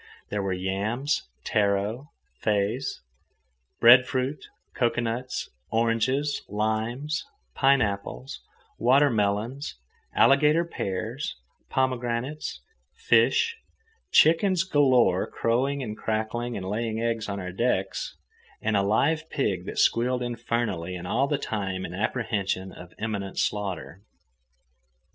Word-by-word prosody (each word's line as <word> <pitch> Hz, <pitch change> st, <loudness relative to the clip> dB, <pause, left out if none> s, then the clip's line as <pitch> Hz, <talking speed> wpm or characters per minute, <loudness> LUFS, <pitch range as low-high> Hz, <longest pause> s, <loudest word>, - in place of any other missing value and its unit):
There 105 Hz, -, -1 dB
were 95 Hz, -1 st, -2 dB
yams, 100 Hz, -, -1 dB
taro, 105 Hz, +6 st, 0 dB, 0.3 s
feis, 105 Hz, +5 st, 0 dB, 0.8 s
breadfruit, 130 Hz, +3 st, +5 dB, 0.3 s
cocoanuts, 120 Hz, +1 st, -1 dB, 0.2 s
oranges, 115 Hz, +6 st, +1 dB
limes, 115 Hz, -, -1 dB, 0.3 s
pineapples, 130 Hz, -2 st, 0 dB, 0.4 s
watermelons, 120 Hz, -1 st, +2 dB, 0.4 s
alligator 150 Hz, +4 st, +5 dB
pears, 110 Hz, -, -4 dB, 0.3 s
pomegranates, 130 Hz, +2 st, -1 dB, 0.3 s
fish, 460 Hz, 0 st, +3 dB, 0.5 s
chickens 170 Hz, +3 st, +5 dB
galore 130 Hz, -, +3 dB
crowing 135 Hz, +4 st, 0 dB
and 105 Hz, -3 st, -5 dB
cackling 110 Hz, +3 st, -2 dB
and 95 Hz, -1 st, -5 dB
laying 110 Hz, +2 st, -2 dB
eggs 115 Hz, -1 st, -1 dB
on 100 Hz, 0 st, -3 dB
our 90 Hz, -1 st, -5 dB
decks, 95 Hz, -2 st, -1 dB, 0.4 s
and 110 Hz, -1 st, 0 dB
a 100 Hz, -, +4 dB
live 155 Hz, +11 st, +1 dB
pig 95 Hz, -, -1 dB
that -, -, -5 dB
squealed 125 Hz, +1 st, +2 dB
infernally 115 Hz, -7 st, -2 dB
and 90 Hz, 0 st, -6 dB
all 125 Hz, +8 st, +2 dB
the 145 Hz, 0 st, 0 dB
time 95 Hz, -6 st, -3 dB
in 85 Hz, -, -7 dB
apprehension 100 Hz, -3 st, -1 dB
of 90 Hz, -1 st, -12 dB
imminent 100 Hz, -3 st, -3 dB
slaughter. 95 Hz, -5 st, -2 dB
115 Hz, 100 wpm, -26 LUFS, 100-130 Hz, 0.8 s, breadfruit